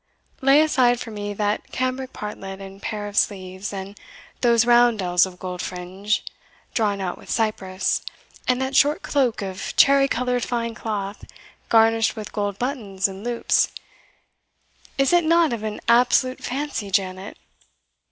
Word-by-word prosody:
Lay 275 +3 +6
aside 255 -6 +3
for 230 - -7
me 205 -1 -4
that 210 0 -2
cambric 255 0 -2
partlet 195 -2 -7
and 195 0 -10
pair 210 -2 -4
of 205 - -9
sleeves 190 -2 -1
and 195 0 -7 0.5
those 235 -1 +4
roundells 220 -7 +4
of 180 -1 -12
gold 180 -1 -5
fringe, 185 +4 -3 0.5
drawn 205 -3 +1
out 185 -2 -4
with - - -15
cyprus 195 -4 0 0.5
and 250 0 +2
that 265 +1 -2
short 290 +3 +4
cloak 255 -7 0
of 190 -1 -5
cherry 275 0 +6
coloured 250 -1 -1
fine 235 -1 -2
cloth, 205 -2 -5 0.4
garnished 225 0 +4
with 215 -2 -7
gold 205 -2 -2
buttons 215 -7 -1
and 195 +1 -9
loops; 240 0 +1 1.3
is 275 +4 +2
it 350 0 +5
not 330 -3 +3
of 230 - -4
an 215 -1 -4
absolute 250 +2 +3
fancy, 265 -5 -3
Janet?" 190 +1 -2
220 Hz, 145 wpm, -23 LUFS, 195-250 Hz, 1.3 s, Lay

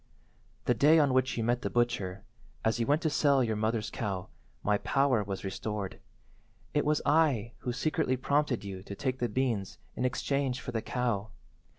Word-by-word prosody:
"The 125 - +4
day 145 +8 +5
on 145 -4 +4
which 130 -1 +2
you 115 - 0
met 120 +2 +1
the - - -2
butcher, 100 -6 0 0.4
as 110 +1 +2
you 115 - 0
went 145 +3 +2
to 160 - +2
sell 140 -3 +4
your 110 -2 0
mother's 110 +1 -1
cow, 95 -5 -3 0.3
my 105 0 +2
power 135 -5 +2
was 100 -1 -5
restored. 100 0 -4 0.7
It 145 - +2
was 150 0 +2
I 145 -8 +3
who 125 - -3
secretly 130 0 0
prompted 140 -2 +1
you 95 -2 -6
to 100 +1 -8
take 130 +3 -2
the 120 - 0
beans 115 -7 -1 0.2
in - - -2
exchange 130 0 0
for - - -6
the 110 - -1
cow. 115 -5 -1
120 Hz, 185 wpm, -30 LUFS, 105-135 Hz, 0.7 s, day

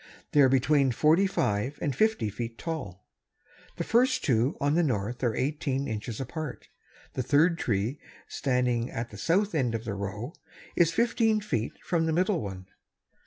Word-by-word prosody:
They 145 - +5
are 135 - +6
between 135 +1 +3
forty 160 +10 +4
five 125 - -1
and 140 -4 -2
fifty 220 - +1
feet 115 +2 -6
high. 160 - -4 0.8
The - - -1
first 245 +3 +2
two 125 -1 +2
on 145 +1 +1
the 170 - +3
north 120 - -1
are 115 -3 +1
eighteen 140 -1 -1
inches 110 +1 -4
apart. 150 +3 -6 0.4
The - - -2
third 160 +6 +3
tree 110 +5 -1 0.3
standing 125 -3 0
at 115 +1 -5
the 105 - -9
south 195 - +1
end 125 -7 +1
of 115 +1 -5
the 100 - -3
row 100 - -5 0.4
is 170 -2 +4
fifteen 225 +2 +2
feet 120 - -2
from 165 -2 0
the 160 - +1
middle 180 0 +1
one. 95 -2 -6
135 Hz, 165 wpm, -28 LUFS, 115-165 Hz, 0.8 s, are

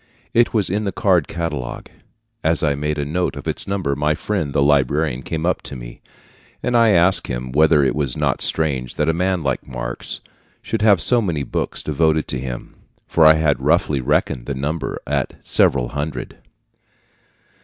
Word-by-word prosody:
It 120 +1 +4
was 105 -6 0
in 105 +2 0
the 100 - -1
card 90 -5 +2
catalogue. 75 -7 -4 0.6
As 80 0 +1
I 75 -2 +3
made 75 +2 -2
a 70 - -1
note 90 +5 -1
of - - -8
its - - -2
number, 95 -8 -1
my 75 +1 +1
friend 90 -5 -2
the 70 - +2
librarian 70 -1 +2
came 80 +4 -3
up 90 - +1
to - - -8
me, - - -10 0.6
and 125 - 0
I 115 -1 +5
asked 90 -1 +3
him 60 +1 -4
whether 75 +1 +4
it 65 - +2
was 70 -5 -1
not - - 0
strange 65 -6 0
that 75 - 0
a - - +3
man 90 0 0
like 65 -3 -2
Marx 60 -1 -5 0.4
should 115 - -2
have 100 -5 +5
so 125 -1 +3
many 85 -9 -1
books - - -3
devoted 80 +1 +1
to 65 - -2
him, 65 -2 -6 0.3
for 80 -2 +5
I 80 - +8
had 75 -4 +1
roughly 75 -1 +2
reckoned 60 -1 0
the 70 - -2
number 75 +5 -3
at - - -1
several 60 -3 +2
hundred. 70 -2 -5
75 Hz, 185 wpm, -20 LUFS, 70-85 Hz, 0.6 s, I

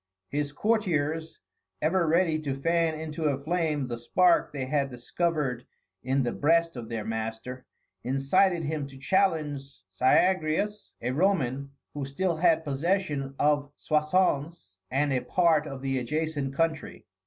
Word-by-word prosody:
His 145 0 -2
courtiers, 160 -5 0 0.4
ever 170 +2 +1
ready 165 -1 +2
to 140 -3 -3
fan 165 0 +1
into 160 0 -4
a 140 -3 +2
flame 155 -3 0
the 120 -2 -5
spark 175 +8 +3
they 140 -3 -3
had 140 0 0
discovered 135 0 -2 0.3
in 135 +1 +1
the 120 - -1
breast 165 +2 +2
of 120 -2 -7
their 110 -2 -4
master, 110 +3 -5 0.4
incited 160 +8 +2
him 150 -2 -2
to 135 -1 -13
challenge 155 -2 +1 0.3
Syagrius, 180 - +1
a 125 - 0
Roman 140 -5 +1 0.2
who 145 - -4
still 165 +5 -1
had 165 -1 +3
possession 145 -2 -1
of 145 -1 +1
Soissons 150 - 0
and 140 +1 +1
a 130 - +2
part 165 -4 +2
of 135 -2 -7
the 135 -1 0
adjacent 145 +1 -2
country. 160 -1 -2
150 Hz, 140 wpm, -28 LUFS, 135-165 Hz, 0.4 s, spark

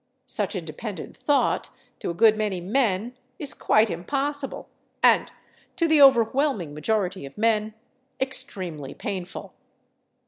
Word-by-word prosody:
Such 210 -5 -3
independent 185 +3 -6
thought, 290 -1 +1 0.3
to - - -4
a 170 - -3
good 220 +4 +6
many 210 -4 -1
men, 220 +3 0 0.2
is 295 -7 -2
quite 215 0 +3
impossible, 275 - -2 0.4
and - - +5 0.4
to 335 -3 +2
the 315 -2 +5
overwhelming 255 - +4
majority 185 +3 -1
of 135 0 -10
men, 215 -1 +1 0.4
extremely 180 - -4
painful. 185 -3 -6
215 Hz, 115 wpm, -25 LUFS, 185-265 Hz, 0.4 s, good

